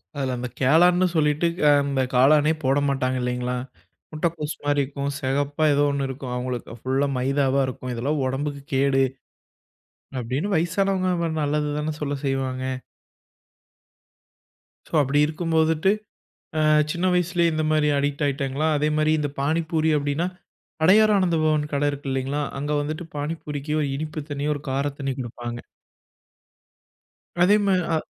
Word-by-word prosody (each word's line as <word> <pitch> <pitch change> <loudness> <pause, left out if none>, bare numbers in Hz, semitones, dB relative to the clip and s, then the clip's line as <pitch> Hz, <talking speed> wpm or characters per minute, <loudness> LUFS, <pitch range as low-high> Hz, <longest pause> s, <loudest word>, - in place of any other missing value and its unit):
அதுல 130 -3 -1
அந்த 125 0 -4
காளான்னு 175 +6 +5
சொல்லிட்டு, 150 +2 +2 0.2
அ - - +7
அந்த 140 -1 0
காளானே 150 +4 +5
போடமாட்டாங்க 135 -1 +1
இல்லைங்களா? 125 0 -2 0.6
முட்டைகோஸ் 155 -1 -2
மாரி 145 -1 +2
இருக்கும். 140 +1 -4
செகப்பா 145 +3 0
ஏதோ 145 +1 +3
ஒண்ணு 140 -1 -1
இருக்கும், 130 -1 -6
அவுங்களுக்கு. 125 -2 -4
ஃபுல்‌லா 135 +2 +1
மைதாவா 135 +1 +1
இருக்கும். 130 0 -5
இதெல்லாம் 140 +5 -1
உடம்புக்கு 140 +2 -3
கேடு. 135 0 +3 1.2
அப்டீன்னு, 135 - -2
வயசானவங்க 185 +3 +1
நம்ம 170 -2 -1
நல்லது 150 0 0
தானே 155 +1 -2
சொல்ல 145 -1 -1
செய்வாங்க 130 -1 -1 2.2
சோ - - -22
அப்டி 140 +2 +1
இருக்கும் 165 +2 -3
போதுட்டு, 160 +4 +3 0.7
அ - - +2 0.3
சின்ன 175 +3 -1
வயசுலயே 175 -1 +2
இந்த 155 0 0
மாரி 155 -1 +3
அடிக்ட் 145 +1 -1
ஆயிட்டாங்களா, 140 +2 -1
அதேமாரி 155 +1 +1
இந்த 145 -1 -1
பானிபூரி 160 +1 +1
அப்டீன்னா, 145 +4 -1 0.6
"அடையார் 210 +4 +6
ஆனந்த 180 -4 +2
பவன்" 155 -1 +2
கடை 145 +1 +1
இருக்கு 140 -1 -6
இல்லைங்களா? 135 +3 -1 0.2
அங்க 145 +1 -2
வந்துட்டு 155 +3 -5
பானிபூரிக்கு 150 -1 -4
ஒரு 140 - -1
இனிப்பு 155 0 -4
தண்ணீ, 145 0 -3
ஒரு 145 - -7
கார 135 +2 0 0.2
தண்ணீ 135 -1 -2
குடுப்பாங்க. 120 0 -6 1.9
அதே 205 +3 +6
மா 195 - +3 0.2
அ. - - +3
145 Hz, 135 wpm, -24 LUFS, 135-155 Hz, 2.2 s, அ